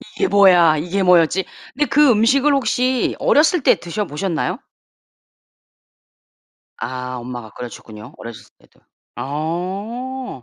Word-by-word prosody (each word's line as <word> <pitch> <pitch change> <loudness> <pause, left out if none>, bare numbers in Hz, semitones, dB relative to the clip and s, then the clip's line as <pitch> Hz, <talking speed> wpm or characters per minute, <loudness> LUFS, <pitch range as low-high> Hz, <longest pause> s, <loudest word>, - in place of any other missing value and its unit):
이게 - - 0
뭐야? 180 -6 +5
이게 180 +5 -2
뭐였지? 180 +1 +3 0.3
근데 295 +3 0
그 295 -1 +4
음식을 265 +6 +3
혹시 255 -2 0
어렸을 315 +3 +3
때 - - +5
드셔 185 +5 -4
보셨나요? 160 +1 -3 2.2
아 125 0 -5
엄마가 120 -2 -8
끓여 125 -1 -7
주셨군요 105 -2 -12
어리셨을 115 -1 -11
때도. - - -27 0.4
어 190 - -5
180 Hz, 255 characters per minute, -19 LUFS, -, 2.2 s, 뭐야